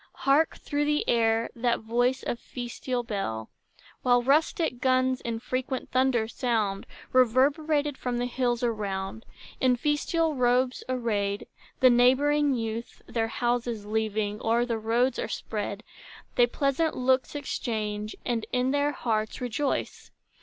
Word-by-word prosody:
Hark, 285 +4 +3
through 290 0 -1
the 295 0 0
air, 225 -1 +2
that 235 0 0
voice 245 +3 +1
of 235 - -3
festal 245 0 -4
bell, 195 - -4 0.5
While 245 -1 +3
rustic 305 - +2
guns 255 0 +2
in 230 -1 -3
frequent 255 +2 -3
thunders 255 -3 +1
sound, 215 -6 -1 0.3
Reverberated 285 +4 +3
from 245 -1 -2
the 245 - 0
hills 245 -1 -1
around. 210 -2 -3 0.3
In 255 -1 +4
festal 300 +4 0
robes 250 0 +1
arrayed, 210 -5 -1 0.4
The 255 -1 +7
neighboring 275 +4 +4
youth, 225 0 -5
Their 225 -1 -1
houses 240 -2 -1
leaving, 215 -1 -1
o'er 235 +2 +2
the 230 -2 -2
roads 235 +3 +1
are - - -2
spread; 205 0 -4 0.5
They 245 - +4
pleasant 280 +5 0
looks 260 +2 +1
exchange, 215 -7 -3
and 235 -3 -1
in 250 +1 +1
their 285 +1 +1
hearts 220 -4 -2
Rejoice. 250 +3 -2
245 Hz, 130 wpm, -27 LUFS, 225-260 Hz, 0.5 s, The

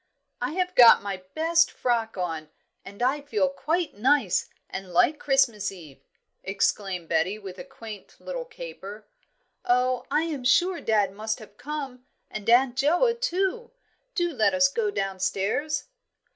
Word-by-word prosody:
"I - - -2
have 365 0 -1
got 240 - +8
my 200 -2 -3 0.2
best 330 +1 +3
frock 230 -4 -1
on, 165 -4 -3 0.3
and 200 +4 -7
I 275 +4 +1
feel 210 -10 0
quite 310 - -1
nice, 290 - +2 0.2
and 190 -1 -7
like 290 - +3
Christmas 235 -8 +2
Eve," 155 -8 -13 0.4
exclaimed 195 -2 -1
Betty, 170 +5 +1
with 195 -3 -9
a - - -6
quaint 225 -6 -11
little - - -5
caper. 220 - -9 0.6
"Oh, 250 +1 +1
I 300 +3 +2
am 305 -6 -4
sure 345 +8 +3
dad 210 -3 +2
must 220 +2 -3
have 215 -3 -14
come, 265 0 -6 0.3
and 215 +1 -4
Aunt 245 +1 +4
Joa, 350 - +3
too. 450 +2 -1 0.5
Do 345 -1 +1
let 220 -2 +2
us 275 0 +5
go 425 +8 -1
downstairs." 205 - -1
250 Hz, 145 wpm, -26 LUFS, 200-310 Hz, 0.6 s, got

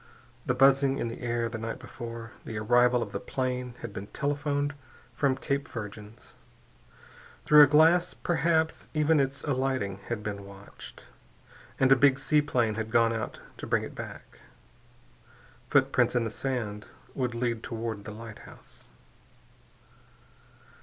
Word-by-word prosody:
The 130 - +1
buzzing 135 +1 +4
in 120 - -2
the 115 - -8
air 120 -1 -1
the 115 -1 -6
night 115 +1 -4
before.... 115 -2 -8
The 110 - -6
arrival 120 +2 +3
of - - -9
the - - -3
plane 125 -1 -3
had 115 -3 -7
been 100 +1 -6
telephoned 145 +1 -1 0.4
from 135 -2 +1
Cape 140 +1 -2
Virgins. 105 0 -9 1.1
Through 150 0 +8
a 145 - +9
glass, 160 +4 +4
perhaps, 165 -2 0
even 155 0 +3
its 135 0 -1
alighting 130 -8 -1
had 115 -3 -3
been 100 -1 -5
watched. 100 0 -12 0.7
And 130 0 +4
a - - +9
big 135 +1 +4
seaplane 135 -6 +1
had 110 0 -4
gone 115 0 +3
out 110 -1 -5 0.2
to - - -7
bring - - +1
it - - -7
back. - - -9 1.3
Footprints - - +3
in 120 - +2
the 110 - -3
sand 110 -5 -4 0.3
would 125 -3 -2
lead 115 -1 -1
toward 115 -3 -5
the - - -6
lighthouse. 110 0 -12
125 Hz, 140 wpm, -28 LUFS, 115-140 Hz, 1.3 s, a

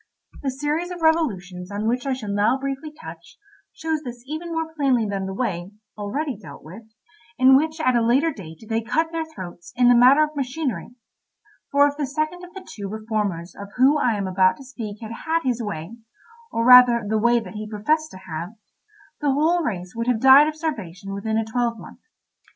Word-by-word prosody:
The 275 - -1
series 295 +6 -2
of 350 -2 -7
revolutions 190 - 0
on 205 +2 -3
which 245 +3 -1
I 270 - +1
shall 215 -6 -5
now 205 +5 +2
briefly 275 +3 -5
touch 165 - -12 0.3
shows 320 -1 -3
this 245 -4 -9
even 315 +4 -6
more 325 -1 -3
plainly 265 -7 +1
than 195 -1 -3
the 190 - -5
way 190 -5 -3 0.2
(already 255 +7 -3
dealt 175 -9 -12
with) 180 +8 -11 0.6
in 260 +1 +7
which 315 +3 +1
at 255 -5 +2
a 235 - +3
later 265 +8 +3
date 170 - -11
they 225 +1 0
cut 320 +9 0
their 330 -1 -2
throats 180 - -10
in 245 0 +4
the 245 - +6
matter 260 +5 +7
of 305 0 -3
machinery; 265 -2 -3 0.8
for 285 0 +5
if 290 0 -4
the 290 -3 -2
second 310 +5 -3
of 360 - -11
the 375 -1 -10
two 200 -2 -7
reformers 210 -5 -3
of 200 - -8
whom 275 +4 +5
I 235 -6 +1
am 200 - -2
about 185 0 +3
to 275 - -12
speak 225 -5 -8
had 225 0 -7
had 320 +8 -1
his 245 -2 -1
way—or 230 - -7
rather 250 -2 +8
the 220 +1 +1
way 235 +2 +3
that 225 - -9
he 215 0 -6
professed 305 +9 0
to - - -11
have—the 220 - -7
whole 325 +5 +2
race 185 - -4
would 230 +1 -3
have 245 -3 +2
died 265 +4 +8
of 310 - -3
starvation 200 - -5
within 220 +2 -2
a 225 - 0
twelve 235 0 -1
month. - - -12
245 Hz, 200 wpm, -23 LUFS, 205-300 Hz, 0.8 s, rather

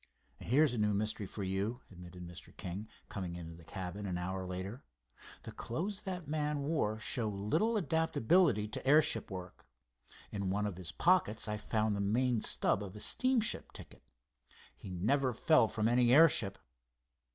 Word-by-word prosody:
"Here's 140 +2 +3
a 120 - -2
new 105 -1 +2
mystery 105 -1 -2
for 100 - -6
you," 100 +6 -2
admitted 90 -1 -10
Mr. 85 - -12
King, 95 +4 -5 0.2
coming 90 -4 -5
into 85 -1 -7
the 85 0 -14
cabin 95 +4 -6
an 90 -2 -2
hour 95 +1 -3
later. 95 +7 -5 0.6
"The - - -7
clothes 190 - -4
that 180 -5 -5
man 150 -1 -1
wore 140 -8 0
show 110 +2 -1
little 155 - 0
adaptability 160 - +2
to 110 - -6
airship 145 -6 +4
work. 90 -1 -8 0.6
In 100 -2 -2
one 105 +2 0
of 100 -4 -3
his 90 -4 -5
pockets 165 - +2
I 105 0 -2
found 110 0 0
the 100 - -1
main 115 +3 +1
stub - - +1
of 100 0 -8
a - - -8
steamship 255 - +1
ticket. - - -12 0.7
He - - -10
never 125 +9 +1
fell 155 0 +4
from 110 0 0
any 120 0 +4
airship. 130 -9 +5
110 Hz, 165 wpm, -34 LUFS, 95-145 Hz, 0.7 s, airship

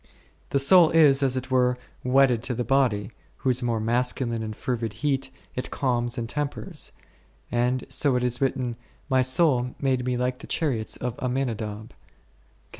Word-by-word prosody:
The - - +1
soul 160 +5 +6
is, 145 -4 +5
as 130 -2 +1
it 130 +1 -5
were, 125 -1 +3 0.3
wedded 125 -2 +3
to 125 - -1
the 120 - -1
body, 120 -5 +1 0.3
whose 130 -1 +1
more 120 -2 0
masculine 120 +1 0
and 110 -1 -5
fervid 115 -3 -3
heat 135 -2 0 0.2
it 125 - -4
calms 120 -2 -1
and 115 -1 -3
tempers; 145 +3 -4 0.6
and 125 +2 0
so 140 -4 +2
it 125 - +1
is 125 +1 0
written, 125 -3 -1 0.3
my 130 0 +4
soul 130 -2 +2
made 130 -2 +1
me 125 0 -1
like 125 0 -1
the - - -11
chariots 125 -9 -1
of 125 -1 -4
Amminadab 115 -5 -3
ra. - - -24
125 Hz, 165 wpm, -25 LUFS, 120-135 Hz, 0.6 s, soul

